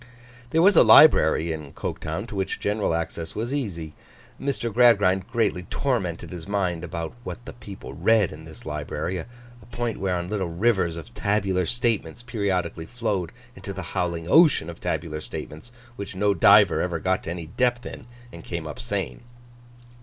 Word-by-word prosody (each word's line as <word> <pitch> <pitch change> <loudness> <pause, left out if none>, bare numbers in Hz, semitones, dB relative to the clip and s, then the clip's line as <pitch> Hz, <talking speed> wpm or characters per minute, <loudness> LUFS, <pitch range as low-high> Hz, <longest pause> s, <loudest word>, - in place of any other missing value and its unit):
There 165 +5 +3
was 200 +2 +6
a - - +8
library 80 - +6
in 75 -3 -6
Coketown, 80 +7 -4
to 105 - -7
which 95 -1 -2
general 105 -5 0
access 85 0 -4
was 115 +5 -3
easy. 85 - -4 0.5
Mr. 125 -5 -2
Gradgrind 100 -5 +4
greatly 110 -6 +1
tormented 105 -14 -2
his 85 -1 -8
mind 90 -4 -1
about 85 -1 -5
what 120 - -7
the - - -8
people 105 -4 -10
read 105 +2 +3
in 75 +1 -10
this 80 -1 -13
library: 75 +4 -3
a 80 - -7 0.4
point 120 0 -3
whereon 90 -2 -1
little 95 -3 -2
rivers 90 -2 +1
of 85 - -10
tabular 95 -3 0
statements 120 -5 -1
periodically 95 -8 -2
flowed 105 -8 -2 0.2
into 95 +1 -7
the 95 -1 -6
howling 85 -3 -1
ocean 150 - +5
of 85 - -14
tabular 75 -1 -3
statements, 80 +8 -8 0.3
which 100 -1 -6
no 100 +1 +2
diver 100 +3 +6
ever 90 -2 -1
got 95 +3 0
to - - -4
any 85 -1 -5
depth 120 +8 0
in - - -8 0.3
and 85 - -10
came 85 -2 -5
up 80 +11 -7
sane. 100 -5 -3
95 Hz, 170 wpm, -25 LUFS, 85-110 Hz, 0.5 s, a